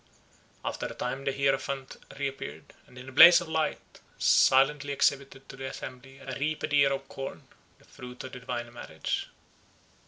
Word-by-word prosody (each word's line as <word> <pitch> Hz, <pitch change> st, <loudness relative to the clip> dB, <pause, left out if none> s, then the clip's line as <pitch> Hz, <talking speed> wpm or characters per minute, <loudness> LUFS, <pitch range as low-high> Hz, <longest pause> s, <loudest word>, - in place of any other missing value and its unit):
After -, -, -3 dB
a -, -, -9 dB
time 130 Hz, +2 st, -4 dB
the 135 Hz, -, +1 dB
hierophant 135 Hz, 0 st, -1 dB, 0.2 s
reappeared, 135 Hz, -1 st, -6 dB
and 125 Hz, -, -17 dB
in 125 Hz, +1 st, -10 dB
a -, -, -11 dB
blaze 170 Hz, +6 st, +9 dB
of 175 Hz, -, -7 dB
light 160 Hz, -1 st, -3 dB, 0.2 s
silently 140 Hz, +2 st, +4 dB
exhibited 135 Hz, -1 st, 0 dB
to -, -, -10 dB
the 135 Hz, 0 st, -6 dB
assembly 130 Hz, +1 st, -9 dB
a 135 Hz, -1 st, -7 dB
reaped 155 Hz, +1 st, -2 dB
ear 140 Hz, -1 st, +5 dB
of 135 Hz, 0 st, -3 dB
corn, 135 Hz, 0 st, -7 dB, 0.3 s
the -, -, -24 dB
fruit 125 Hz, 0 st, -10 dB
of 130 Hz, -, -8 dB
the 130 Hz, -, -8 dB
divine 120 Hz, -1 st, -5 dB
marriage. 80 Hz, -9 st, -4 dB
135 Hz, 165 wpm, -28 LUFS, 130-140 Hz, 0.3 s, blaze